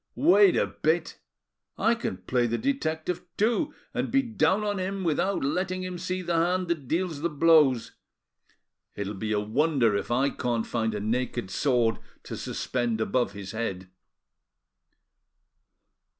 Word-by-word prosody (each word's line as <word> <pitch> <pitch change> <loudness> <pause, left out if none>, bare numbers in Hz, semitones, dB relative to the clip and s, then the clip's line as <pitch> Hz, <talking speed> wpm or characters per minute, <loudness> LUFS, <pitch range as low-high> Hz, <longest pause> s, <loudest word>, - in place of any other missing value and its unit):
Wait 195 +1 +5
a - - +3
bit! 160 +1 -1 0.6
I 225 - +3
can 230 - -3
play 120 +6 0
the 120 +1 -1
detective 180 - -1 0.2
too, 240 +8 +1 0.2
and - - -1
be 270 0 +3
down 215 -3 +1
on 205 -2 -1
him 190 +1 -3
without 180 +4 0
letting 185 +6 -1
him 180 -1 -5
see 185 +1 -3
the 175 0 -2
hand 175 +2 +1
that 155 -6 -2
deals 165 -1 -1
the 170 - 0
blows. 145 -7 +4 1.0
It'll 100 0 -4
be 105 +2 -4
a 105 - +2
wonder 120 +1 +2
if 100 - -2
I 130 +4 +2
can't 120 -3 -1
find 110 -2 -1
a - - -2
naked 120 -1 -2
sword 120 -4 +1 0.2
to - - -6
suspend 120 -3 -2
above 125 +2 0
his 100 -2 -7
head." 95 -5 -4
150 Hz, 150 wpm, -27 LUFS, 115-185 Hz, 1.0 s, Wait